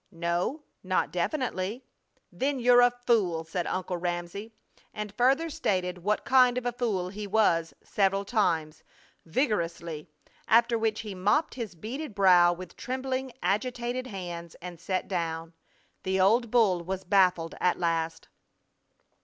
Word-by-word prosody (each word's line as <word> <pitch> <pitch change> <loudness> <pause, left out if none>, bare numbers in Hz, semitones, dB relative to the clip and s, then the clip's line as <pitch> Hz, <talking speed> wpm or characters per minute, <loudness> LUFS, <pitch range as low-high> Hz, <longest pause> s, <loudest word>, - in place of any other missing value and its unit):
"No, 175 - -2 0.2
not - - 0
definitely." 245 - -2 0.5
"Then 275 0 -1
you're 245 0 +6
a 245 - +6
fool!" 230 -9 0
said 170 +2 -3
Uncle 185 -1 -2
Ramsey, 175 +5 -4 0.4
and 210 -1 -5
further 270 +8 +3
stated 185 - -1
what 210 +4 -1
kind 250 -1 +5
of 250 - -3
a 245 - +1
fool 215 -7 -2
he 205 +2 -6
was, 170 -6 +2
several 195 0 +1
times, 165 -8 0 0.5
vigorously. 170 - -2 0.4
After 235 +1 +4
which 220 -1 0
he 210 -2 -6
mopped 205 - +1
his 230 -7 -6
beaded 235 - -6
brow 180 -3 +6
with 180 0 -8
trembling, 260 0 -3
agitated 245 +4 -1
hands, 175 -5 -7
and 175 -1 -9
sat 185 +2 -2
down. 165 -2 -3 0.5
The 190 0 -1
old 225 +5 +3
bull 210 -7 +3
was 190 +2 -4
baffled 180 -3 +2
at 180 - +2
last. 165 -1 -1
195 Hz, 135 wpm, -28 LUFS, 175-240 Hz, 0.5 s, you're